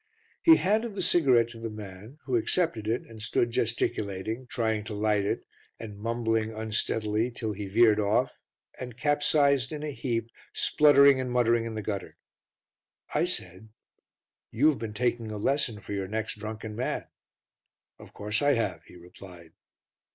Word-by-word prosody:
He 325 - +8
handed 215 - 0
the 190 - -1
cigarette 130 -10 +4
to 115 -1 -11
the 115 0 -4
man 105 +4 -10
who 130 - -1
accepted 120 - +1
it 115 +2 0
and 110 -2 -12
stood 120 +2 0
gesticulating, 115 0 -2
trying 110 -3 -1
to 105 - -6
light 105 -1 +1
it - - -2 0.3
and 105 -3 -8
mumbling 115 0 -1
unsteadily 110 0 -1
till 115 -2 -4
he 100 0 -6
veered 110 +1 +4
off 110 +5 0 0.4
and 125 -2 -7
capsized 145 -1 +2
in 150 -1 -5
a 150 - -3
heap, 115 -4 -3 0.2
spluttering 140 -2 +5
and 130 -1 -2
muttering 120 -1 +2
in 115 -1 -5
the 110 - -4
gutter. 100 -2 -5 1.0
I - - +2
said, 90 +5 -4 0.8
"You 140 +8 +3
have 150 - -1
been 110 -2 -6
taking 120 -1 -1
a 105 - -5
lesson 130 -1 0
for 100 - -7
your 100 -1 -3
next 110 +1 -4
drunken 110 0 -6
man." 125 +3 -2 0.9
"Of - - -13
course 105 +4 -2
I 145 0 +4
have," 115 -9 -2
he - - -16
replied. 90 -1 -14
115 Hz, 160 wpm, -28 LUFS, 105-130 Hz, 1.0 s, He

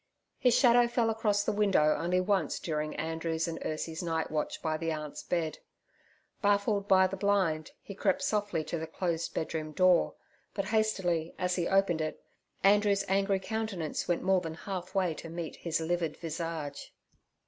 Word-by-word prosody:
His 250 -2 +4
shadow 240 -2 +6
fell 235 -1 +1
across 210 -2 +1
the - - 0
window 195 -7 +3
only 180 +2 +1
once 195 +1 +1
during 155 -2 -3
Andrew's 160 +1 -2
and 165 -1 -4
Ursie's 160 +1 -3
nightwatch 160 -3 -2
by 160 -1 -1
the 165 +1 -2
aunt's 150 -2 -5
bed. 165 -3 -2 0.8
Baffled 205 -1 +2
by 190 -1 +6
the 185 +1 -2
blind, 190 -6 +1
he 200 - -8
crept 195 -1 0
softly 205 -6 0
to 160 +2 -3
the 160 - -4
closed 170 0 -2
bedroom 155 -1 -3
door, 185 +1 +4 0.4
but 195 -1 -1
hastily 190 -6 0
as 180 0 0
he 175 -2 0
opened 195 -4 +2
it, 155 - -3 0.4
Andrew's 205 0 +4
angry 195 0 +2
countenance 205 -5 -3
went 175 - 0
more 190 0 +3
than 165 -2 -5
half 185 +1 -6
way 185 -4 +2
to 165 - -9
meet 165 0 -5
his 165 -2 -1
livid 165 -1 -1
visage. 165 -3 -5
180 Hz, 165 wpm, -30 LUFS, 160-200 Hz, 0.8 s, shadow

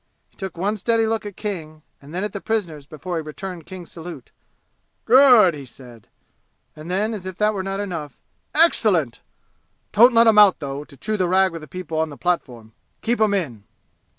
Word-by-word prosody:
He - - -34
took 190 -3 -7
one 205 +5 -1
steady 225 +2 +1
look 220 -1 -2
at 205 - -9
King 160 -7 -6 0.2
and 140 +1 -14
then 180 +3 -3
at 210 - -4
the 200 - -5
prisoners 170 -9 -3
before 170 +4 -5
he - - -2
returned 165 +2 -8
King's 185 -2 -10
salute. 165 -6 -10 0.7
"Good!" 245 -7 +7
he 145 -2 -8
said. 120 -3 -14 0.7
And 155 +2 -10
then, 205 +5 0
as 190 -4 -6
if 185 -1 -7
that 210 0 +2
were 195 - -3
not 195 +1 -4
enough: 165 -9 -5 0.4
"Excellent! 205 - +3 0.7
Don't 240 +4 +6
let 230 0 +6
'em 220 -2 +6
out, 205 -3 +7
though, 140 -1 -5
to 140 - -17
chew 215 +6 -3
the 185 -2 +1
rag 190 +1 +3
with 165 -2 -9
people 165 -3 -5
on 160 0 0
the 145 - -10
platform. 125 -11 -3 0.3
Keep 235 0 0
'em 210 -2 +3
in!" 130 - -3
185 Hz, 195 wpm, -22 LUFS, 155-210 Hz, 0.7 s, Good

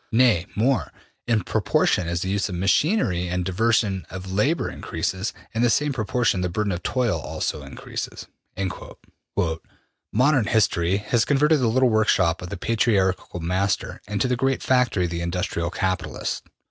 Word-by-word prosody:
Nay 110 -7 +4
more, 120 +5 +1 0.4
in 115 -4 +2
proportion 85 - +1
as 85 +1 -1
the 95 - -3
use 100 +1 0
of 90 - -4
machinery 95 - +2
and 90 0 -2
diversion 100 0 +1
of 95 +1 -7
labor 140 - +1
increases, 95 +3 -3 0.2
in 115 - 0
the 120 - +4
same 150 +4 +2
proportion 120 -4 0
the 90 - 0
burden 105 +3 -1
of 90 -1 -3
toil 120 -10 0
also 75 +1 -3
increases.'' 70 -1 -6 0.3
``Modern 90 -3 -4 0.9
industry 95 -4 +2
has 110 +3 +1
converted 150 +3 +3
the 125 - +2
little 130 +3 +3
workshop 95 -6 +2
of 90 - -6
the - - -5
patriarchal 95 -5 0
master 95 +4 -1
into 105 +5 0
the 125 - +1
great 135 +2 0
factory 125 -8 +2
of 85 - -4
the 85 0 -3
industrial 85 -1 -2
capitalist. 95 +1 -3
100 Hz, 155 wpm, -24 LUFS, 90-120 Hz, 0.9 s, Nay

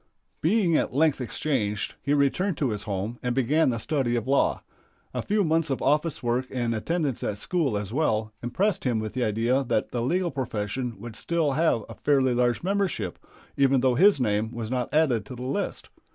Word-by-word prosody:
Being 175 -1 +3
at 130 - 0
length 150 -2 +3
exchanged, 115 -5 -2
he 145 +1 +1
returned 145 +5 +1
to 135 -6 0
his 105 -1 -3
home 100 +5 -3
and 125 -1 -1
began 135 +4 +3
the 120 - -1
study 125 0 0
of 115 -2 -1
law. 140 +1 +2 0.5
A - - -2
few 210 0 +1
months 160 -1 +1
of 135 - -1
office 150 +1 +1
work 120 +2 0
and 120 -3 -1
attendance 145 +3 -1
at 105 - -2
school, 140 - 0
as 105 +1 -5
well, 110 -7 0
impressed 180 - 0
him 125 -4 +1
with 110 -1 -3
the 125 - -1
idea 115 +5 +1
that 115 -3 0
the 120 - -2
legal 175 +8 0
profession 120 -2 -3
would 115 +1 -8
still 165 +2 0
have 135 -7 +1
a 115 - -8
fairly 135 +1 +2
large 120 +1 +1
membership, 195 0 -1 0.4
even 135 -2 +3
though 130 -1 +3
his 190 +5 +5
name 110 -2 0
was 115 -1 -5
not 125 -2 -1
added 140 -8 +2
to 130 - -7
the 125 - -7
list. 140 +11 -3
130 Hz, 195 wpm, -26 LUFS, 115-155 Hz, 0.5 s, his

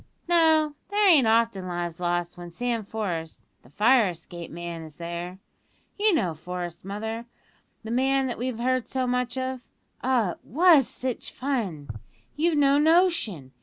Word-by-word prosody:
"No; 320 -3 +4 0.2
there 410 0 +3
ain't 295 -10 +6
often 225 -4 +2
lives 175 -1 -4
lost 175 0 -1
when 175 0 -9
Sam 235 +5 -2
Forest, 180 -7 -4 0.2
the 120 - -20
fire 220 - +4
escape 170 0 -8
man, 170 0 -6
is 155 -2 -11
there. 170 +2 -6 0.6
You 425 +1 +3
know 185 - 0
Forest, 175 +1 -6
mother, 220 +4 -5 0.6
the 220 - -6
man 265 +2 +2
that 245 -3 -4
we've 250 -1 -3
heard 255 +1 0
so 260 -1 -1
much 250 0 -1
of? 260 -1 -3 0.4
Ah, 245 -7 +1
it - - -10
was 315 - +5
sitch 255 -2 -4
fun! 220 - -3 0.5
You've 320 +1 +1
no 280 0 +4
notion! 310 - +2
230 Hz, 155 wpm, -26 LUFS, 175-265 Hz, 0.6 s, ain't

